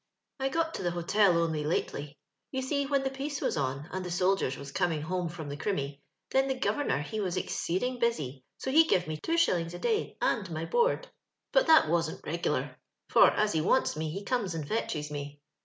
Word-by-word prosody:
" - - -56
I 270 0 0
got 325 +2 0
to - - -4
the 175 - 0
hotel 175 +2 +3
only 160 -2 0
lately. 150 -1 -2 0.3
You 265 -1 -3
see, 280 +1 0
when 275 -1 +1
the 265 - -1
peace 275 +1 -4
was - - 0
on 140 +1 -2
and 185 0 -3
the 180 - -5
soldiers 180 -5 +1
was 140 0 -8
coming 165 -2 0
home 180 +1 -2
from 160 -2 -7
the 145 - -4
Crimmy, 140 -7 -2 0.3
then 270 0 +3
the 265 - 0
go 260 - +1
vernor 285 - 0
he 215 +9 -4
was 185 -3 -1
exceeding 215 +8 -1
busy, 145 - -1
so 265 - -3
he 320 +4 +7
give 185 - +2
me 155 0 -3
two 330 - -1
shillings 175 - +2
a - - -7
day 440 - -1
and 195 -5 0
my 160 0 -3
board; 485 - +1 0.4
but - - +4
that 320 - +7
wasn't 165 0 -1
reg'lar, 170 +3 -2 0.3
for - - +7
as 210 0 +1
he 160 - +2
wants 185 +6 +2
me 155 0 -2
he 195 +6 -5
comes 210 -9 -1
and 155 -3 -4
fetches 150 -7 -2
me. 145 0 -6
180 Hz, 220 wpm, -30 LUFS, -, 0.4 s, he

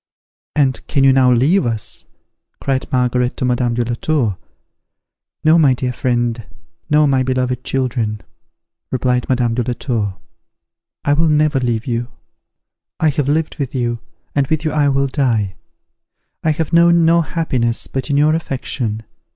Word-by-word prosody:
"And 135 -3 +1
can 140 -3 +1
you 135 -1 +6
now 130 -1 +4
leave 140 +11 +3
us?" 115 -3 -3 0.5
cried 135 -1 -2
Margaret 125 -1 +1
to - - -1
Madame 120 -1 0
de 120 0 0
la 120 - -2
Tour. 120 -5 0 1.1
"No, 160 +2 +5
my 140 -5 +4
dear 125 0 -2
friend, 120 -1 -1 0.5
no, 150 0 +4
my 135 -2 +2
beloved 125 -1 -1
children," 120 -5 -2 0.7
replied 125 -1 0
Madame 120 -3 +1
de 125 - 0
la 120 +1 -2
Tour; 110 -7 -2 0.9
"I 145 - +3
will 160 +2 +2
never 150 -2 +2
leave 120 -3 -1
you. 120 -1 -2 0.9
I 160 - +3
have 145 -1 -1
lived 155 +2 0
with 135 -2 -3
you, 120 -2 -1 0.3
and 140 -2 +1
with 155 +1 -1
you 155 - +1
I 145 -2 +2
will 135 0 +1
die. 120 -8 0 0.9
I 160 - +2
have 155 +1 -1
known 170 0 +5
no 170 +1 +4
happiness 130 -9 -1
but 135 +2 -4
in 140 - +1
your 150 +2 +4
affection. 125 -8 -3
130 Hz, 160 wpm, -18 LUFS, 120-150 Hz, 1.1 s, you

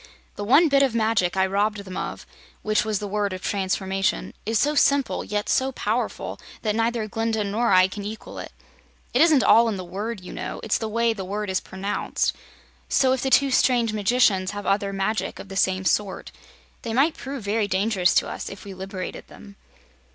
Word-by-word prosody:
"The 205 - -5
one 280 +11 +5
bit 280 -2 +4
of 265 -4 +2
magic 220 -5 +1
I 190 - +4
robbed 200 +1 -1
them 185 -1 -8
of - - -5 0.4
which 215 0 +2
was 215 -1 -1
the 205 - -4
Word 205 -1 -1
of 185 - -7
Transformation 195 +1 -1
is 225 0 +1
so 295 +7 +2
simple, 280 -2 +2
yet 210 0 -3
so 265 +1 +1
powerful, - - -2 0.2
that 215 -2 +1
neither 230 -1 0
Glinda 225 +1 -1
nor 215 +3 0
I 185 0 +6
can 200 +2 -7
equal 215 +2 -7
it. - - -7 0.6
It 250 - +3
isn't 315 -5 +5
all 230 +1 +6
in 210 - -2
the 185 - -5
word, 200 +5 -5
you 180 - -10
know, - - -5
it's 220 - 0
the 220 - -3
way 230 +1 +1
the 200 -3 -6
word 205 +1 -3
is 185 - +1
pronounced. 195 +2 -2 0.5
So 260 -1 +3
if 260 - -1
the 265 - 0
two 275 +1 +4
strange 240 -4 +3
magicians 205 -3 +2
have 205 0 -6
other 200 0 +1
magic 195 +3 -2
of 195 - -10
the 195 - -7
same 190 -1 +1
sort, 195 +3 -1 0.5
they 230 - -4
might 285 +7 +3
prove 270 -3 -6
very 205 +1 0
dangerous 190 -2 +1
to - - +3
us, - - -5
if 195 - -10
we 200 - -7
liberated 190 0 -6
them." 200 -1 -14
210 Hz, 205 wpm, -24 LUFS, 195-230 Hz, 0.6 s, I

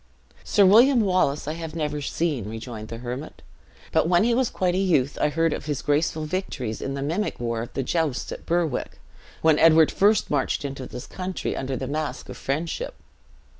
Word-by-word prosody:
"Sir 200 - +4
William 235 +6 +6
Wallace 180 -8 +1
I 155 - -1 0.2
never 150 -2 -2
have 145 - -4
seen," 145 - -1
rejoined 110 -1 -7
the 115 - -6
hermit; 125 +5 -7 0.5
"but, - - +3
when 175 +2 +4
he 235 +1 +3
was 255 0 +2
quite 180 -1 0
a - - 0
youth, 150 -8 +2
I - - +3
heard 165 +1 +1
of - - -5
his 145 -2 -2
graceful 155 +1 +1
victories 150 - -3
in 135 - -3
the 140 - -3
mimic 170 +9 -2
war 115 -1 -2
of 115 - -7
the 135 - -1
jousts 155 -1 -1
at - - -8
Berwick, 165 -5 -1 0.4
when 160 -2 +5
Edward 160 -1 +6
first 210 +2 +3
marched 145 0 0
into 135 -2 -5
this 125 +1 -8
country 185 0 -4
under 135 -1 -3
the 130 - -4
mask 145 -1 -4
of - - -7
friendship. 170 - -3
150 Hz, 195 wpm, -24 LUFS, 135-180 Hz, 0.5 s, William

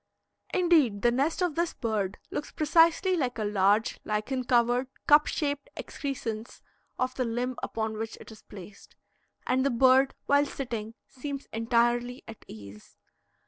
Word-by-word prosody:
Indeed, 310 - +3
the 240 - +4
nest 290 +8 0
of 355 -3 0
this 340 +2 -1
bird 205 -4 -2
looks 295 - -4
precisely 330 +4 +3
like 255 -8 -1
a 220 - -2
large, 205 +1 +2
lichen 215 +5 -2
covered, 245 +1 +2 0.2
cup 295 +1 +6
shaped 285 -2 -2
excrescence 235 -5 -5 0.3
of 255 0 -1
the 255 - -1
limb 245 +2 -2
upon 220 -1 -3
which 225 0 -5
it - - -12
is 215 - -13
placed. 200 0 -13 0.5
And 260 +1 +1
the 275 - +2
bird, 260 +2 +4
while 285 +1 +3
sitting, 230 -5 -5
seems 275 +1 -6
entirely 240 +2 +1
at 225 - -11
ease. 105 0 -12
245 Hz, 145 wpm, -28 LUFS, 220-280 Hz, 0.5 s, cup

